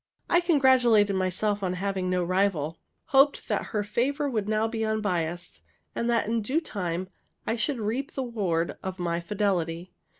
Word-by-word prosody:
I 345 Hz, -, +6 dB
congratulated 255 Hz, -, +4 dB
myself 190 Hz, +3 st, 0 dB
on 185 Hz, -2 st, -1 dB
having 190 Hz, 0 st, -2 dB
no 180 Hz, -1 st, +1 dB
rival, 175 Hz, -4 st, 0 dB, 0.3 s
hoped 275 Hz, +1 st, +4 dB
that -, -, 0 dB
her 210 Hz, -2 st, -1 dB
favor 265 Hz, +8 st, 0 dB
would 215 Hz, -6 st, -2 dB
now 215 Hz, +1 st, +2 dB
be 225 Hz, 0 st, -3 dB
unbiased, 180 Hz, -6 st, -2 dB, 0.3 s
and 235 Hz, -, -1 dB
that 235 Hz, -1 st, +2 dB
in 230 Hz, 0 st, 0 dB
due 260 Hz, +9 st, +1 dB
time 185 Hz, -, -3 dB, 0.4 s
I 225 Hz, -, 0 dB
should 250 Hz, +4 st, 0 dB
reap 230 Hz, +5 st, -2 dB
the 270 Hz, -, -1 dB
reward 190 Hz, -9 st, -1 dB
of 190 Hz, 0 st, -5 dB
my 170 Hz, -2 st, -1 dB
fidelity. 175 Hz, -2 st, -1 dB
205 Hz, 165 wpm, -27 LUFS, 180-235 Hz, 0.4 s, I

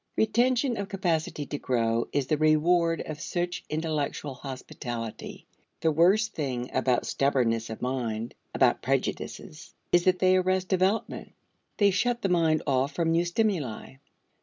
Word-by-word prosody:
Retention 240 Hz, +3 st, +2 dB
of 200 Hz, 0 st, -4 dB
capacity 165 Hz, -6 st, -1 dB
to 145 Hz, -, -5 dB
grow 115 Hz, -2 st, 0 dB
is 140 Hz, -2 st, 0 dB
the 155 Hz, -, +1 dB
reward 165 Hz, +2 st, +3 dB
of 155 Hz, -1 st, -7 dB
such 175 Hz, 0 st, -3 dB
intellectual 155 Hz, -2 st, -2 dB
hospitality. 120 Hz, -4 st, -7 dB, 0.4 s
The 160 Hz, -, +3 dB
worst 195 Hz, +8 st, +3 dB
thing 125 Hz, -5 st, -3 dB
about 125 Hz, -2 st, +1 dB
stubbornness 120 Hz, -5 st, +1 dB
of 110 Hz, -, -7 dB
mind, 120 Hz, -3 st, -2 dB, 0.2 s
about -, -, +2 dB
prejudices, 155 Hz, +2 st, -3 dB, 0.2 s
is 175 Hz, 0 st, +4 dB
that 185 Hz, -1 st, +4 dB
they 185 Hz, 0 st, +4 dB
arrest 185 Hz, 0 st, 0 dB
development; 190 Hz, +3 st, 0 dB, 0.4 s
they 200 Hz, -1 st, +4 dB
shut 235 Hz, +5 st, 0 dB
the 195 Hz, -, +1 dB
mind 165 Hz, -3 st, +2 dB
off 135 Hz, +2 st, 0 dB
from 165 Hz, -1 st, +1 dB
new 170 Hz, +1 st, +2 dB
stimuli. 175 Hz, -, -2 dB
160 Hz, 140 wpm, -27 LUFS, 130-185 Hz, 0.4 s, is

